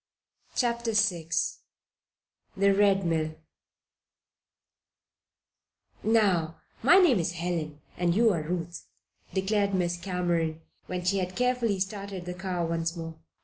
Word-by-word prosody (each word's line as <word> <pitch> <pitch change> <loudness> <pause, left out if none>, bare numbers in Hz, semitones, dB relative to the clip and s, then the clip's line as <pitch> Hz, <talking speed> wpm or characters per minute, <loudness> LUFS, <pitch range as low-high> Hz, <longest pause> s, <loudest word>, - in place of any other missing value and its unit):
CHAPTER 235 -2 0
VI 185 -7 +1 1.3
THE 200 +1 +4
RED 195 -1 +3
MILL 160 -2 0 2.7
"Now, 190 -8 +2 0.2
my 315 +11 +7
name's 240 - +4
Helen, 165 -4 -3 0.2
and 175 -1 +1
you 225 0 +4
are 165 - -1
Ruth," 170 +1 -4 0.5
declared 200 +1 +1
Miss 175 -1 0
Cameron, 175 -3 -1 0.3
when 180 -1 -4
she 195 +2 +2
had 185 0 -3
carefully 245 -5 +1
started 195 -1 -4
the 180 - -4
car 180 -1 -2
once 165 +1 -1
more. 165 -1 -7
180 Hz, 110 wpm, -28 LUFS, 170-205 Hz, 2.7 s, my